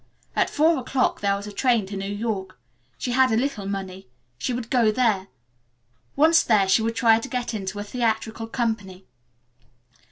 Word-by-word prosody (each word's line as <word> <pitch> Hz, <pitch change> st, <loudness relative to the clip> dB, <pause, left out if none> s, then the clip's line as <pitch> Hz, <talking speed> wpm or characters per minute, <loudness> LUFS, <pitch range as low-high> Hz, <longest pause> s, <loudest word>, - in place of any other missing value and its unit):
At -, -, +2 dB
four 315 Hz, +2 st, +3 dB
o -, -, -7 dB
'clock 255 Hz, +1 st, 0 dB
there 200 Hz, -1 st, +2 dB
was 200 Hz, 0 st, -6 dB
a 210 Hz, -, -7 dB
train 235 Hz, 0 st, +1 dB
to 200 Hz, +1 st, -7 dB
New 195 Hz, +1 st, -4 dB
York. 205 Hz, -3 st, -4 dB, 0.4 s
She 250 Hz, -, -3 dB
had 260 Hz, 0 st, +4 dB
a 220 Hz, -, +2 dB
little 240 Hz, -6 st, -2 dB
money. 190 Hz, -3 st, -5 dB, 0.3 s
She -, -, -2 dB
would 240 Hz, -1 st, -4 dB
go 235 Hz, -4 st, +4 dB
there. 215 Hz, -5 st, +1 dB, 0.9 s
Once 320 Hz, +3 st, +5 dB
there 210 Hz, -4 st, +3 dB
she 190 Hz, +4 st, +4 dB
would 225 Hz, +1 st, -1 dB
try 225 Hz, -2 st, +4 dB
to 265 Hz, -, -7 dB
get 250 Hz, -2 st, -3 dB
into 200 Hz, -1 st, -4 dB
a 205 Hz, -, -3 dB
theatrical 225 Hz, 0 st, -2 dB
company. 210 Hz, -6 st, -3 dB
225 Hz, 185 wpm, -24 LUFS, 200-245 Hz, 0.9 s, Once